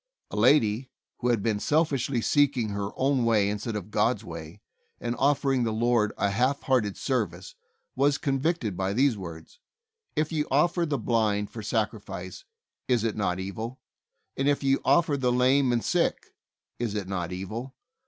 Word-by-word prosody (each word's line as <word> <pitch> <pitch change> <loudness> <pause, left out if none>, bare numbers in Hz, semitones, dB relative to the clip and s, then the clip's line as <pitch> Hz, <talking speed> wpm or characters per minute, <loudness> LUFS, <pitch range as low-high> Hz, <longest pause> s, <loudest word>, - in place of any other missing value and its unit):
A - - -5
lady, 120 +1 +3 0.3
who 125 - -1
had 115 -5 +1
been 110 -3 0
selfishly 140 -3 +1
seeking 135 -4 +2
her 100 0 -3
own 135 -1 +1
way 110 -4 +3
instead 105 +2 -3
of 105 0 -5
God's 110 +1 +1
way, 80 0 -9 0.4
and 120 0 -2
of 140 +1 +3
fering 135 -3 +1
the 115 - 0
Lord 115 -1 +2
a 100 0 +1
half 125 +7 +1
hearted 120 -7 +1
service, 100 - -2 0.4
was 140 +1 +3
convicted 135 - -1
by 95 +2 -1
these 130 +2 +3
words: 85 -5 -9 0.6
"If 155 +1 0
ye 155 -2 +1
offer 170 +5 +2
the 145 -2 0
blind 105 -4 0
for 115 - -7
sacrifice, 110 - -3 0.4
is 120 -4 +2
it 115 -2 -1
not 95 -3 -1
evil? 110 +6 -5 0.6
and 135 +1 +1
if 145 0 +1
ye 135 0 +3
offer 160 -4 +3
the 125 -2 +1
lame 130 +1 +3
and 120 -1 0
sick, - - 0 0.5
is 115 -3 -2
it 100 -3 -3
not 90 -3 -3
evil? 110 +8 -6
120 Hz, 170 wpm, -27 LUFS, 105-135 Hz, 0.6 s, lady